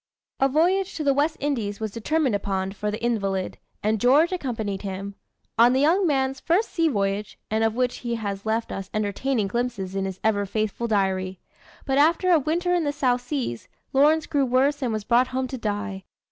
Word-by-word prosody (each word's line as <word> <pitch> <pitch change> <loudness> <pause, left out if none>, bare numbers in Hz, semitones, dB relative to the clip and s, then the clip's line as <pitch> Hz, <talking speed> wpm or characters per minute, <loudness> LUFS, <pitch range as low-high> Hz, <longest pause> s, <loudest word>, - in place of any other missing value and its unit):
A 270 - +3
voyage 360 +7 +2
to 315 - -3
the 280 -1 +3
West 295 +3 +1
Indies 230 -8 -2
was 220 -2 -3
determined 270 +4 0
upon, 195 -1 -1
for 210 +1 -3
the 210 - -3
invalid, 195 -5 -1 0.2
and 215 0 +1
George 290 +8 +5
accompanied 225 - -3
him 195 0 -5 0.5
on 240 +2 +7
the 260 - +2
young 350 +6 +3
man's 270 -2 0
first 365 +7 +1
sea 330 -1 +2
voyage, 200 -5 -1
and 220 +1 +1
of 225 0 +1
which 250 0 0
he 235 -1 -3
has 200 -3 -4
left 225 +1 -1
us 195 0 -5
entertaining 215 +3 0
glimpses 230 -4 -3
in 195 0 -1
his 190 -1 -5
ever 205 -2 +1
faithful 215 +3 -2
diary. 190 -3 0 0.5
But 270 0 +1
after 335 +5 +4
a 335 - +6
winter 345 +5 0
in 350 -2 +2
the 290 - 0
South 255 -4 +1
Seas, 245 - -4 0.3
Lawrence 300 +3 +4
grew 285 -1 +1
worse 265 +3 +2
and 250 -3 0
was 215 -1 -2
brought 245 +4 +3
home 260 0 -2
to 260 - -4
die. 205 -3 -3
240 Hz, 200 wpm, -24 LUFS, 205-285 Hz, 0.5 s, on